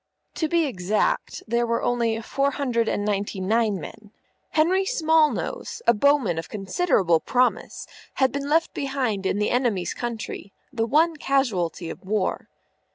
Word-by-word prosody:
To 315 - -1
be 335 0 +2
exact, 210 -5 -1
there 235 +1 +1
were 230 0 0
only 230 -2 0
four 275 +4 0
hundred 250 -5 -1
and 205 - -1
ninety 205 -1 -2
nine 210 +1 +1
men. 210 +5 -10 0.4
Henry 360 +5 +2
Smallnose, 320 +2 0
a - - +6
bowman 235 - +2
of 165 - -7
considerable 195 - +1
promise, 250 +9 0 0.3
had 265 -1 +2
been 280 0 -4
left 325 +2 +2
behind 255 -9 -2
in - - 0
the 210 - 0
enemy's 240 -8 0
country, 225 -4 -6 0.2
the 225 -1 0
one 315 +5 +3
casualty 195 - 0
of - - -11
war. 200 0 -2
235 Hz, 150 wpm, -24 LUFS, 205-280 Hz, 0.4 s, a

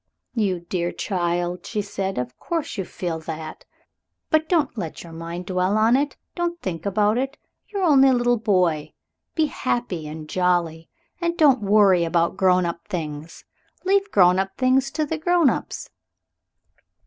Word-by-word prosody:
"You 200 -7 0
dear 175 0 -2
child!" 175 -2 -2
she 210 - -2
said; 195 -1 -3
"of 125 0 -3
course 330 -3 -3
you 195 -3 -3
feel 170 -2 -4
that. 160 -1 -7 0.7
But 315 0 +2
don't 325 -8 +1
let 175 -8 -5
your 170 -1 -11
mind 170 +2 -6
dwell 185 +2 +1
on 225 +3 +4
it. 285 +2 0 0.2
Don't 345 -1 -2
think 175 - -4
about 210 +3 +2
it. 270 +2 -3 0.3
You're 400 -2 -3
only 275 -5 +6
a - - +4
little 245 -1 +2
boy. 180 -8 +1 0.4
Be 315 - +3
happy 240 - -2
and 155 0 -8
jolly, 175 -2 0 0.3
and 340 -1 -1
don't 275 -6 +5
worry 200 -3 +4
about 170 0 +1
grown 185 -1 +3
up 170 0 -5
things. 155 -2 -6 0.4
Leave 395 +1 +2
grown 180 - +5
up 195 0 -3
things 260 +1 +3
to 300 +2 -1
the 315 +2 -3
grown 345 -3 +4
ups." - - -5
195 Hz, 160 wpm, -23 LUFS, 170-265 Hz, 0.7 s, only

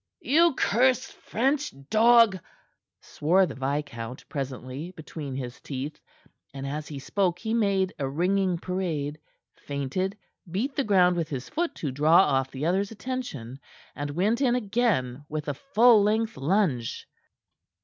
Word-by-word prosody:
"You 320 +2 +4
cursed 255 +3 +2
French 275 +5 -1 0.2
dog!" 225 -2 +6 0.6
swore 180 +6 +2
the - - -6
viscount 135 -3 -4
presently, 135 +2 -5
between 150 -3 -7
his 125 -2 -6
teeth, 140 +2 -5 0.6
and 135 0 -5
as 150 +2 -4
he 145 - -7
spoke 180 +5 0
he 220 +3 -3
made 200 -4 +1
a 135 -2 -1
ringing 180 +4 +1
parade, 165 -5 -3 0.3
feinted, 145 +8 -3 0.3
beat 230 - -2
the 280 - +1
ground 180 -4 +4
with 165 -2 -2
his 130 -3 -5
foot 335 +2 -2
to 145 - -3
draw 150 +5 +4
off 135 -6 +1
the 135 +3 -4
other's 190 +4 +1
attention, 210 - -6 0.4
and 145 +2 -4
went 215 +8 +1
in 250 -3 +3
again 200 - 0
with 155 -1 -4
a 145 - 0
full 235 - +5
length 220 +2 +1
lunge. 140 - 0
180 Hz, 140 wpm, -26 LUFS, 140-220 Hz, 0.6 s, dog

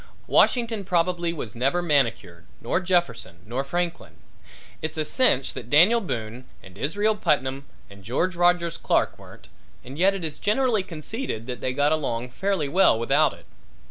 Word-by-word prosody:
Washington 230 -4 +2
probably 175 -1 0
was 120 -10 -6
never 135 +8 0
manicured 125 - -1
nor 120 - -1
Jefferson 170 - -1
nor 125 +5 -3
Franklin; 170 +4 -3 0.7
it's 155 0 -4
a 155 - 0
cinch 150 - +2
that 120 - -8
Daniel 180 - +5
Boone 120 - -5 0.2
and 95 -1 -14
Israel 205 - 0
Putnam 140 -7 -1 0.2
and 100 -1 -15
George 165 - -1
Rogers 175 -1 +2
Clark - - 0
weren't - - -15 0.4
and 135 +5 -9
yet 195 +2 +4
it 190 - -5
is 155 -2 -5
generally 220 0 +1
conceded 170 - -6
that 125 -2 -6
they 130 - -1
got 145 +2 +2
along 125 -6 -2
fairly 190 0 -1
well 175 -4 +4
without 140 +7 +2
it. - - -16
155 Hz, 160 wpm, -24 LUFS, 125-180 Hz, 0.7 s, Daniel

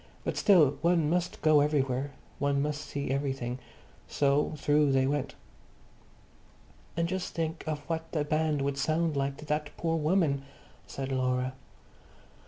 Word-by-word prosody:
But - - -2
still 165 - +5
one 165 -3 +3
must 175 -3 -1
go 155 -1 +6
everywhere; 140 -2 0 0.3
one 140 0 +1
must 150 +1 -1
see 140 -2 -4
everything. 135 -3 -2 0.5
So 140 +2 +2
through 145 -1 +3
they 130 0 +3
went. 140 0 -1 1.6
"And 170 0 +1
just 185 +1 -4
think 165 0 -2
of 150 -1 -2
what 165 -1 -3
the 155 -3 0
band 155 -1 +1
would 140 0 -1
sound 160 +2 +1
like 140 0 -1
to 155 - -10
that 150 0 -1
poor 165 -1 0
woman," 155 -3 +2 0.5
said 135 0 -5
Laura. 130 0 0
145 Hz, 145 wpm, -29 LUFS, 140-160 Hz, 1.6 s, go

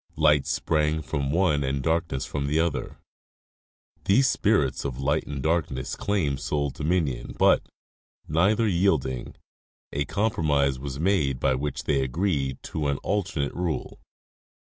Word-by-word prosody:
Light 75 -3 +3
sprang 80 0 0
from 70 0 -2
one 80 -3 +2
and 70 0 -1
darkness 80 -4 0
from 70 -1 -3
the 75 +3 +1
other; 85 -2 -1 1.1
these 130 +8 +4
spirits 100 -12 +1
of 65 -3 -4
light 70 +3 0
and 70 -2 -5
darkness 75 -5 -1
claimed 80 -10 -1
sole 70 -2 -1
dominion, 75 -5 -1
but, - - +4 0.6
neither 100 +9 +2
yielding, 75 - 0 0.6
a 70 0 0
compromise 75 - +1
was 70 0 -5
made 75 -8 +1
by 65 - +2
which 70 +2 -3
they 70 -3 +1
agreed 70 0 -1
to 75 -2 -3
an 70 -1 0
alternate 95 -8 -1
tule. 85 -3 -3
75 Hz, 135 wpm, -26 LUFS, 70-85 Hz, 1.1 s, these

